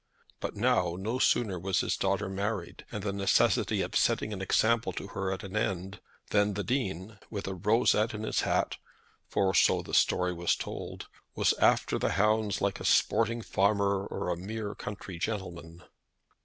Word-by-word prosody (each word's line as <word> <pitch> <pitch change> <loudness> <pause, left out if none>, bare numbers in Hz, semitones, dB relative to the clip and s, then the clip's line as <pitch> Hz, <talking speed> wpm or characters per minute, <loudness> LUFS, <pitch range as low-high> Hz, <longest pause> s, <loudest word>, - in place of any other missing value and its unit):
But - - -4
now, 85 -1 +2
no 110 +7 -2
sooner 100 -9 +2
was 95 +2 0
his - - 0
daughter 100 +1 0
married, 95 -1 -4
and 105 - -5
the 100 -2 -2
necessity 100 -1 +2
of - - -6
setting 110 - +2
an 95 - -5
example 115 +4 +2
to 100 - -6
her 95 -1 -2
at 95 - -4
an 100 +1 -7
end, 95 -1 -2 0.3
than 105 -1 +2
the 105 - -2
Dean, 105 - -3
with 100 -3 -5
a 95 - -2
rosette 105 +3 +2
in 105 - -5
his - - 0
hat, - - 0 0.5
for 95 -1 +1
so 90 - +4
the - - -10
story 90 0 +3
was 85 0 +1
told, - - -6 0.3
was - - +3
after - - +3
the - - 0
hounds 105 +1 +1
like 100 -1 0
a - - -7
sporting 115 0 +2
farmer 100 -1 +1
or - - -4
a 90 - 0
mere 105 +3 -5
country 100 -4 -7
gentleman! 85 -4 -5
100 Hz, 175 wpm, -29 LUFS, 95-105 Hz, 0.5 s, so